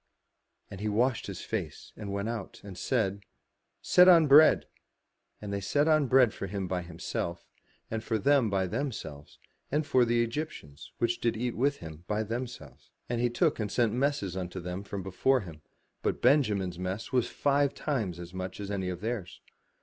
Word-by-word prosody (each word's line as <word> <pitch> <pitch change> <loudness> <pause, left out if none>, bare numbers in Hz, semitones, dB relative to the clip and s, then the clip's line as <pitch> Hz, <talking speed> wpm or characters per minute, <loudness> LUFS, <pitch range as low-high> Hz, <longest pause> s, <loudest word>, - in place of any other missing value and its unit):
And 100 - -8
he 105 - -1
washed 120 +4 +1
his - - -6
face - - -5
and 100 -2 -6
went 100 +1 -2
out, 115 -4 -5
and 100 -2 -9
said, 100 -1 -1 0.3
" - - -51 0.3
Set 180 0 +6
on 170 -3 +8
bread." 150 +2 +7 0.7
And 100 -1 -6
they 100 - -2
set 145 +10 +1
on 155 -4 +3 0.2
for 100 - -6
him 95 0 -3
by 90 0 -2
himself, 85 0 -5 0.5
and 110 0 -3
for 110 - 0
them 130 +1 +3
by 95 -1 +1
themselves, 85 - -5 0.3
and 150 +2 +1
for 130 -3 +4
the 120 0 +2
Egyptians, 115 - -6
which 120 0 0
did 115 -1 0
eat 120 +1 -2
with 140 +3 +1
him, 80 0 -10
by 105 +1 0
themselves. 115 - -7 0.2
And 120 -1 -1
he 120 - +2
took 120 - +1
and 105 -2 -2
sent 115 -2 +2
messes 125 -8 0
unto 95 0 -4
them 90 +2 -5
from 100 -1 -6
before 125 +8 +2
him, 80 -6 -10 0.4
but - - -1
Benjamin's 105 - +2
mess 95 +7 -4
was 125 -3 +2
five 140 0 +1
times 110 - -2
as 85 0 -9
much 95 +1 -5
as 100 0 -5
any 95 -2 -2
of 90 0 -5
theirs. 110 -5 -4
105 Hz, 185 wpm, -29 LUFS, 95-125 Hz, 0.7 s, on